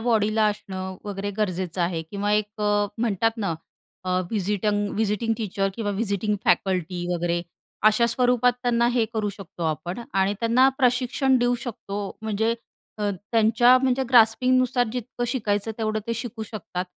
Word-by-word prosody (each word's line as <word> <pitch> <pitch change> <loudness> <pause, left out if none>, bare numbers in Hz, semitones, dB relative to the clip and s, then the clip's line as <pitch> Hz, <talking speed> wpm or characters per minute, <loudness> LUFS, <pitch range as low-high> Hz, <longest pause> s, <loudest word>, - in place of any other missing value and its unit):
बॉडीला 220 -2 +2
असणं 190 -2 -4
वगैरे 205 0 -4
गरजेचं 185 -3 -1
आहे. 170 -1 -1
किंवा 205 +1 -1
एक 210 0 -1
म्हणतात 205 +1 +1
ना 195 -7 -1 0.5
अ, 185 - -2 0.2
व्हिजिटंग 205 0 0
व्हिजिटिंग 220 +1 0
टीचर 195 -2 -1
किंवा 215 -2 -2
व्हिजिटिंग 205 0 -1
फॅकल्टी 180 -1 +1
वगैरे 175 0 -1 0.5
अशा 225 +2 +3
स्वरूपात 245 0 +3
त्यांना 235 -1 +2
हे 240 -2 +2
करू 215 -2 0
शकतो 195 -3 -10
आपण 160 +6 -3
आणि 195 +1 +2
त्यांना 240 +3 +4
प्रशिक्षण 255 +1 +2
देऊ 245 0 +2
शकतो. 205 -4 -5 0.2
म्हणजे 220 +1 0 0.4
अ, 205 -1 0 0.2
त्यांच्या 230 +2 +5
म्हणजे 265 0 +2
ग्रास्पिंगनुसार 250 +1 +4
जितकं 245 0 -4
शिकायचं 210 -3 -1
तेवढं 215 -1 0
ते 230 - -1
शिकू 235 -1 -5
शकतात. 200 -4 -5
215 Hz, 140 wpm, -24 LUFS, 200-235 Hz, 0.5 s, त्यांच्या